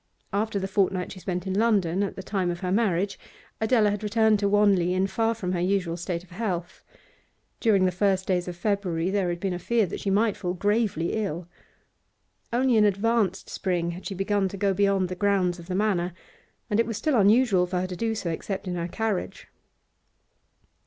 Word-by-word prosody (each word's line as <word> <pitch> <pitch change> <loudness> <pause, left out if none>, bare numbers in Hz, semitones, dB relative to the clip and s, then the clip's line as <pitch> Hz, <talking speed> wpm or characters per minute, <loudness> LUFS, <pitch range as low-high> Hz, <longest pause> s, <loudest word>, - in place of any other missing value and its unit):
After 210 +1 0
the 190 -1 -2
fortnight 190 -2 0
she 185 - -9
spent 180 -1 -3
in 190 - -2
London 200 -4 +2
at 200 - -2
the 190 - -7
time 190 -2 -1
of 175 0 -4
her 180 -1 -2
marriage, 195 -2 +1 0.4
Adela 220 -2 +3
had 205 - -3
returned 220 0 +3
to 200 -1 +1
Wanley 200 -4 +3
in 190 +1 +2
far 225 +3 0
from 185 -5 -3
her 180 - -1
usual 180 -2 0
state 175 0 -4
of 185 - -21
health; 180 -3 -4 0.8
during 200 -5 +3
the 185 - +2
first 190 0 +1
days 180 -2 0
of 175 - -5
February 185 -3 -1
there 195 -3 +1
had 175 0 -3
been 190 0 -1
a 175 - -4
fear 230 +4 +1
that 175 - -6
she 200 - -2
might 210 +2 +2
fall 180 -2 -3
gravely 205 -4 0
ill. 180 -6 -3 1.0
Only 245 0 +3
in 215 - +5
advanced 205 -1 +1
spring 175 -3 -1
had 180 +2 -7
she 195 - -5
begun 195 +1 +1
to 195 - -7
go 200 0 +1
beyond 195 -1 +2
the 185 - -4
grounds 185 -2 +1
of 170 - -11
the 185 - -3
Manor, 185 -4 0 0.5
and 210 -2 0
it 230 - +2
was 225 -3 -3
still 305 -4 +1
unusual 205 -3 +4
for 180 0 -1
her - - -1
to 185 -1 -5
do 225 +3 -1
so 175 -5 -3
except 190 +4 -4
in 180 - -2
her 170 -1 -2
carriage. 215 +1 -3
195 Hz, 205 wpm, -26 LUFS, 180-210 Hz, 1.0 s, in